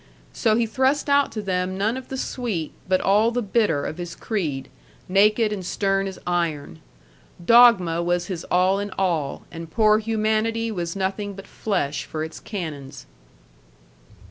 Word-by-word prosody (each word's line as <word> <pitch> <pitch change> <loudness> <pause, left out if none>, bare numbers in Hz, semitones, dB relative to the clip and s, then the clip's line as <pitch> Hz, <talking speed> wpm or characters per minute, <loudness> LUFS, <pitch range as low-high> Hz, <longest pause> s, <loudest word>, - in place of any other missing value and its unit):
So 215 - +2
he 235 +1 +2
thrust 265 +5 +1
out 280 0 +3
to 215 - -4
them 185 -1 -1
none 215 +4 0
of 260 -1 -7
the 265 - -4
sweet 225 - -3 0.2
but 185 0 +2
all 210 +4 +3
the 240 +1 -2
bitter 205 -8 +1
of 155 - -5
his 175 -1 -6
creed, 150 - -3 0.4
naked 210 +3 +3
and 195 -3 -5
stern 195 +1 0
as 190 - -7
iron. 160 - -2 0.7
Dogma 205 -8 +6
was 175 0 0
his 175 -3 -5
all 185 +2 +2
in 205 0 -3
all, 165 -7 -1
and 165 0 -8
poor 215 +3 +4
humanity 225 +1 0
was 175 -3 -4
nothing 195 +1 -2
but 195 - -10
flesh 150 -9 -2
for 155 -1 -4
its 160 0 -7
canons. 150 -9 -7
195 Hz, 160 wpm, -23 LUFS, 170-220 Hz, 0.7 s, Dogma